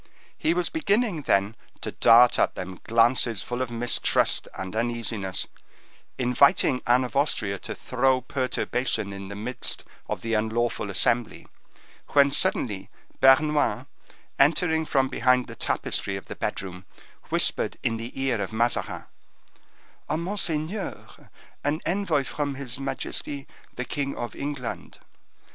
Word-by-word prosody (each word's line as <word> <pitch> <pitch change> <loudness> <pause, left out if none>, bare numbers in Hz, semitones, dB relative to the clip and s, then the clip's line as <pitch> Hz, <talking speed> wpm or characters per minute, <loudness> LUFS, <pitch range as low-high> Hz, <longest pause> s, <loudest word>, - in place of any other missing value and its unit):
He 165 - +1
was 180 0 0
beginning, 220 - +1
then, 100 -4 +1 0.3
to - - -4
dart 120 +1 +6
at - - +2
them 95 0 -6
glances 115 -2 +3
full 125 +1 -3
of 130 - -1
mistrust 120 +1 +1
and 95 +2 -6
uneasiness, 115 -4 -1 0.7
inviting 125 0 +3
Anne 125 +2 +4
of 125 -3 -6
Austria 110 -9 0
to - - -6
throw 130 +1 +1
perturbation 125 -4 -1
in 100 0 -7
the 100 - -7
midst 115 +5 -2 0.3
of - - -3
the 115 0 -2
unlawful 110 0 0
assembly, 115 +4 0 0.7
when, 140 0 +6
suddenly, 110 - +2 0.3
Bernouin, 145 +3 +4 0.5
entering 160 +2 +3
from 135 -2 +2
behind 125 0 +2
the - - -10
tapestry 100 - -2
of 95 - -7
the - - -7
bedroom, 90 -1 -4 0.5
whispered - - 0
in 115 - 0
the 115 +4 -7
ear 130 -5 0
of 95 - -3
Mazarin, 115 +2 0 1.1
"Monseigneur, 170 +2 -4 0.3
an 145 +2 0
envoy 175 -6 +1
from 145 0 -3
his 130 -2 -6
majesty, 135 +1 -4 0.3
the 125 - -3
king 140 0 -3
of 120 - -5
England." 140 -4 -5
125 Hz, 130 wpm, -26 LUFS, 115-145 Hz, 1.1 s, dart